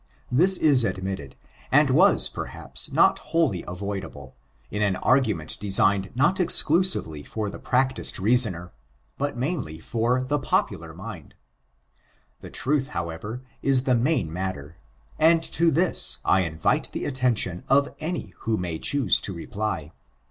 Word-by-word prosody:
This 180 +9 +4
is 140 -7 +4
admitted, 95 - -4 0.4
and - - +4
was, - - +5
perhaps, - - -6
not - - +4
wholly 155 - 0
avoidable, 90 -7 -6 0.4
in 105 - -3
an 100 -3 +1
argument 105 - 0
designed 95 -1 +2
not 175 +9 +2
exclusively 165 - +3
for 105 +7 -4
the - - -9
practiced 130 +1 0
reasoner, 100 -5 +2 0.5
but 145 -2 -2
mainly 130 - -3
for 120 +9 -1
the 145 +3 -1
popular 130 - -1
mind. - - -10 1.0
Their - - -10
truth, 135 0 -1
however, 85 +9 -5 0.2
is 135 -2 +3
the 130 - +1
main 120 - 0
matter; 85 -4 -5 0.4
and 165 +1 +4
to 170 +1 +1
this 165 +4 +2
I 95 - +4
invite 80 -1 -1
the - - -4
attention 125 -10 -1
of 140 +1 +3
any 165 +2 -5
who 110 -1 -1
may 85 -4 -4
choose 140 -8 +2
to 100 - -2
reply. 85 -3 -4
115 Hz, 135 wpm, -24 LUFS, 90-140 Hz, 1.0 s, was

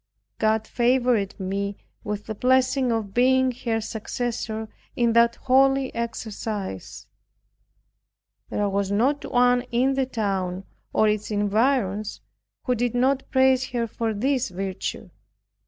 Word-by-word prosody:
God 220 0 +2
favored 240 -4 +1
me 200 +1 -3 0.3
with 210 0 -4
the 220 - -4
blessing 255 +2 +2
of 220 -4 -2
being 260 +1 +4
her 225 -1 +1
successor 220 0 -4 0.3
in 235 -1 +2
that 235 0 +4
holy 270 0 +3
exercise. 215 - -5 1.4
There 205 - 0
was 200 0 -1
not 260 +8 +1
one 245 0 +4
in 255 +3 +2
the 265 -1 0
town, 195 -6 -2 0.3
or 215 - +3
its 210 0 0
environs, 210 0 0 0.4
who 250 - +1
did 245 0 -1
not 265 +2 +1
praise 260 -1 +3
her 240 -1 -1
for 225 0 -2
this 265 +4 0
virtue. 190 +1 -5
230 Hz, 125 wpm, -24 LUFS, 205-255 Hz, 1.4 s, being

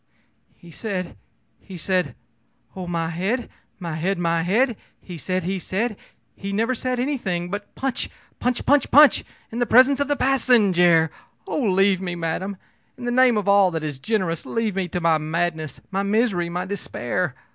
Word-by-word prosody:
ō'He 170 -1 -13
said 185 -4 -4 0.4
he 190 -2 -10
said 180 -2 -1 0.6
oh, 185 -2 -6
my 165 -2 -1
head, 195 +9 -2 0.3
my 170 -4 -5
head, 180 +5 -1
my 170 -1 +1
head! 225 +8 +2 0.2
He 175 -3 -9
said 185 +3 -2
he 190 +2 -2
said 215 +5 -2 0.4
he 195 0 -5
never 225 +5 +1
said 255 0 -2
anything 195 -10 -2
but 205 0 -6
Punch, 265 -1 -2 0.3
punch, 250 0 -1
punch 290 +1 +5 0.3
in 230 - -4
the 240 - +1
presence 260 +4 +6
of 285 - +1
the 290 - +1
passenjare! 190 - +4 0.3
Oh, - - -2
leave 195 -3 +3
me, 175 -2 -3
madam! 175 +4 -3 0.4
In 245 - -7
the 240 - 0
name 250 -2 +4
of 205 -2 -2
all 200 -1 +5
that 160 -2 -4
is 145 -3 -4
generous, 185 -2 -1
leave 225 -4 -2
me 190 -2 -1
to 180 - -3
my 165 -2 +3
madness, 160 -1 -2
my 195 0 0
misery, 200 -4 +1
my 180 +1 -3
despair! 180 -5 -3
190 Hz, 170 wpm, -23 LUFS, 175-230 Hz, 0.6 s, presence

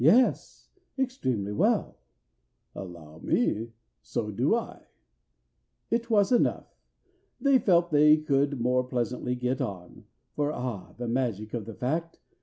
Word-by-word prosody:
"Yes, 230 - +3 0.3
extremely 130 - -1
well." 105 - +1 0.7
"Allow 85 -4 -9
me, 115 +7 0 0.3
so 105 -2 -3
do 125 - +2
I." 235 - -5 1.0
It 235 +1 0
was 205 -2 +3
enough: 245 - +1 0.6
they 270 0 +4
felt 175 -5 +3
they 150 +1 +6
could 140 -2 +1
more 125 +2 +2
pleasantly 125 0 -2
get 125 +1 -1
on, 90 -3 -6 0.3
For 145 0 0
(ah, 125 -8 -5
the 120 0 -4
magic 115 -4 -2
of 115 -4 -3
the 115 -1 -8
fact!) 165 +6 -2
125 Hz, 125 wpm, -28 LUFS, 115-165 Hz, 1.0 s, they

